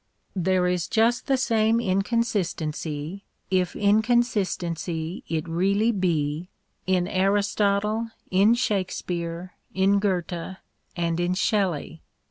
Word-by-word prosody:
There 185 0 +2
is 180 -2 0
just 230 +3 +2
the 270 - +3
same 225 -2 +2
inconsistency, 185 -6 -1 0.3
if 185 -1 +1
incon 220 +4 +3
sistency 175 -5 -3
it 160 0 -2
really 195 +7 +2
be, 170 -4 -1 0.4
in 180 -1 +2
Aristotle, 205 +2 +1 0.2
in 200 +5 +5
Shakespeare, 180 -5 -2 0.2
in 195 +1 +3
Goethe, 185 -2 -2 0.4
and 170 -1 -1
in 175 +1 0
Shelley. 185 -6 0
190 Hz, 100 wpm, -25 LUFS, 170-210 Hz, 0.4 s, in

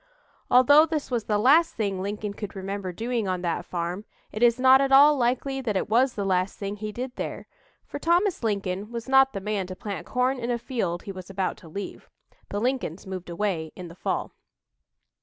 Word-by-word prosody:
Although 285 +5 +7
this 305 -4 -3
was 235 -3 -1
the 210 - +1
last 290 +10 +4
thing 200 -4 -2
Lincoln 205 +1 -4
could 205 0 -7
remember 195 0 -4
doing 230 +2 -2
on 185 -1 -2
that 170 -2 -2
farm, 175 +3 -3 0.3
it 215 - -6
is 240 0 +4
not 260 +1 +7
at 275 0 +1
all 290 +2 +8
likely 265 +2 0
that 215 -6 -1
it - - -2
was 250 +3 +3
the 200 - -2
last 185 0 0
thing 200 0 -4
he 215 +1 -5
did 250 +3 -6
there, - - -5 0.4
for - - -7
Thomas 350 +3 +2
Lincoln 200 -2 -2
was 235 +1 -5
not 270 0 +5
the 195 - -3
man 200 -1 -2
to 185 - -7
plant 200 0 -6
corn 255 +1 0
in 235 0 -3
a 240 - +1
field 225 -8 -3
he 200 - -6
was 185 -1 -9
about 190 -1 -2
to 165 - -14
leave. 200 +5 -7 0.4
(The 205 - -2
Lincolns 245 - -2
moved 185 -2 -6
away 170 -4 -2
in 180 -2 -8
the 165 - -12
fall.) - - -2
210 Hz, 210 wpm, -26 LUFS, 190-255 Hz, 0.4 s, all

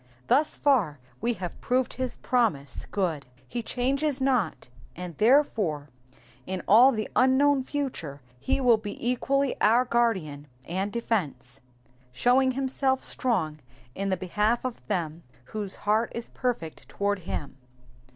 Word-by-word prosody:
Thus 290 - +3
far 220 - +2 0.2
we 240 - +1
have 180 -5 -7
proved 255 0 0
his 255 -2 -3
promise 170 - -1
good; 165 -9 -2 0.2
he 240 - -3
changes 275 +4 -1
not, 260 -6 0 0.3
and 180 -1 -7
therefore 210 - +2 0.6
in 185 -1 -3
all 240 +6 +8
the 215 -4 -2
unknown 265 +1 +4
future 255 - -4 0.2
he 140 - 0
will 245 -4 +5
be 210 -1 -7
equally 270 +2 +1
our 235 +4 +5
guardian 190 - 0 0.2
and 190 +4 -2
defence, 160 - -2 0.3
^* - - -36 0.2
showing 255 - +3
himself 265 0 0
strong 165 -12 -1 0.3
in 195 +1 -2
the 190 - +1
behalf 210 +7 0
of 255 -2 -5
them 170 -5 -2 0.3
whose 205 -3 -2
heart 215 +3 +2
is 235 0 -5
perfect 235 -11 -4
toward 200 -1 -1
him." 145 -5 -6
225 Hz, 135 wpm, -27 LUFS, 175-255 Hz, 0.6 s, all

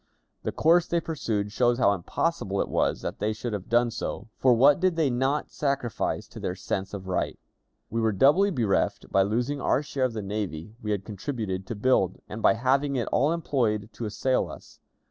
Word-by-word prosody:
The - - -2
course 170 +2 +4
they 170 - +1
pursued 110 -11 -2
shows 120 +2 +2
how 100 -5 +4
impossible 100 - -2
it - - 0
was - - 0
that - - -4
they 110 +1 0
should 110 +1 -5
have 100 -3 -5
done 120 0 +3
so, 110 -1 -5
for 130 - +5
what 140 +7 +6
did 185 -1 +2
they 155 -5 +2
not 135 +4 0
sacrifice 140 -5 -2
to - - -10
their 90 - -3
sense 95 +1 -3
of 95 -1 -8
right! 90 - -1 0.5
We 115 +1 0
were 110 -1 +2
doubly 145 - +4
bereft 115 - 0
by 95 - +4
losing 120 +8 0
our 145 - +2
share 135 -2 -1
of 125 - -2
the 110 -2 -4
navy 100 -3 -4
we 105 - -5
had 100 -2 -1
contributed 100 -4 -4
to 115 - -4
build, 105 -4 +2
and 110 - -7
by - - +5
having 135 +4 +1
it 120 -3 -1
all 145 +5 +3
employed 120 -11 0
to 120 - -5
assail 125 +5 0
us. - - -12
115 Hz, 205 wpm, -27 LUFS, 105-140 Hz, 0.5 s, what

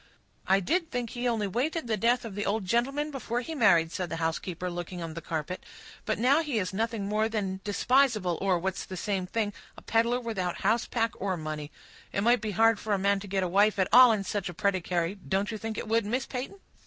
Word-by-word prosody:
"I 195 +1 +5
did 335 - 0
think 245 -3 -3
he 245 0 -2
only 225 -3 0
waited 265 - -1
the 225 -2 0
death 235 +4 +1
of 220 - -6
the 205 +1 -3
old 205 0 -1
gentleman 275 +9 0
before 245 -3 -3
he 320 +6 -6
married," 175 - +4
said 180 -1 -3
the - - -3
housekeeper, 165 +2 -2
looking 175 +1 -5
on 165 -2 -5
the 170 - -6
carpet. 165 +3 -4 0.4
"But - - 0
now 270 +7 +4
he 295 -7 -2
is 185 -2 -1
nothing 225 0 -1
more 215 +2 +1
than 195 -4 -2
despisable, 215 - +2
or, 190 -2 +2
what's 190 +2 -3
the 185 - -7
same 190 -1 -2
thing, 210 +1 -1 0.2
a - - -12
peddler 235 +2 +2
without 195 -7 -3
house, 220 +4 +2
pack, 230 -1 0
or 190 -2 -1
money. 155 -1 -5 0.4
It 195 - -1
might 240 +3 +4
be 215 - -3
hard 225 +2 +3
for 215 - -2
a - - +3
man 200 +1 +2
to 200 - -9
get 190 0 0
a - - 0
wife 200 +4 +3
at 190 -2 +1
all 250 0 +9
in 210 -3 0
such 195 -2 -3
a 175 - -8
predicary—don't 190 +1 -1
you 220 - -5
think 220 0 -4
it - - -4
would, 225 +1 +2
Miss 255 +5 -1
Peyton?" 265 +10 -6
205 Hz, 230 wpm, -28 LUFS, 185-235 Hz, 0.4 s, all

